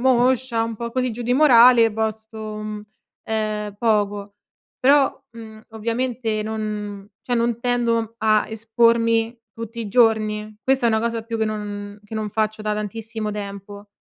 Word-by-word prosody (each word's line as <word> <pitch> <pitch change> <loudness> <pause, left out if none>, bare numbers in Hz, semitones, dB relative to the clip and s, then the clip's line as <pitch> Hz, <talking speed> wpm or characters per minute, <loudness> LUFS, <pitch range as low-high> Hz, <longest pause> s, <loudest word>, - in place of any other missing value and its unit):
moscia 250 -1 +2
un 230 -1 -3
po' 235 +1 -5
così, 255 -1 0
giù 235 +2 -7
di 245 +2 +1
morale, 245 -5 +7
posto, 220 0 -3
mhmm, 215 -1 -5 0.4
ehm, 215 -2 -2
poco. 205 -2 0 0.4
Però, 275 +1 +3
mhmm, 220 -1 -11
ovviamente 230 0 -2
non 210 -2 -4 0.2
cioè 245 - -1
non 235 0 +1
tendo 235 -2 0
a 215 -1 +3
espormi 230 +1 +2 0.2
tutti 230 +1 -7
i 220 - -4
giorni. 215 -2 +2
Questa 265 -2 +2
è - - +4
una 220 -1 +2
cosa 230 0 -2
più 230 0 -4
che 220 - +1
non 205 -1 -5
che 215 - -9
non 215 -1 -3
faccio 215 0 -1
da 210 0 -1
tantissimo 215 +1 -4
tempo. 200 0 -7
220 Hz, 155 wpm, -22 LUFS, 215-235 Hz, 0.4 s, morale